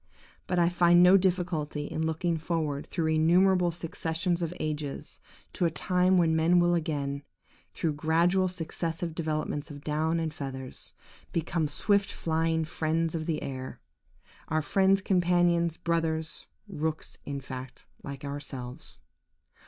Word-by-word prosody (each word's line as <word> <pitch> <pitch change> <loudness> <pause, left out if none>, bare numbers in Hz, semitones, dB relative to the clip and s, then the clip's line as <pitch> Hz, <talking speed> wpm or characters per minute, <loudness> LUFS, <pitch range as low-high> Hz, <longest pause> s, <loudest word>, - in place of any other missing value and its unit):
But 180 - 0
I 170 -1 +4
find 175 0 +5
no 180 +2 +8
difficulty 175 -6 0
in 160 - -3
looking 165 +2 0
forward 155 -3 -2
through 165 -3 -1
innumerable 175 +3 +4
successions 165 +1 -2
of 165 -1 -1
ages 150 -2 -4 0.3
to 175 - 0
a - - +4
time 180 +4 +2
when 165 -2 +3
men 165 +2 +4
will 175 0 +4
again, 145 -4 -1 0.5
through 160 -2 -1
gradual 170 +5 +2
successive 165 -1 -3
developments 155 -2 -2
of 145 -1 -9
down 155 +2 0
and 160 -2 -2
feathers, 130 -3 -6 0.4
become 165 -1 0
swift 200 +6 +1
flying 160 0 0
birds 160 +1 +1
of 160 -1 -3
the 160 -2 -1
air; 130 -1 -6 0.7
our 155 0 0
friends, 195 +4 +3
companions, 175 -2 +2
brothers–rooks, 160 0 -3
in 140 -1 -3
fact, 130 -1 -8 0.2
like 140 0 -7
ourselves. 135 -3 -6
160 Hz, 130 wpm, -29 LUFS, 150-175 Hz, 0.7 s, no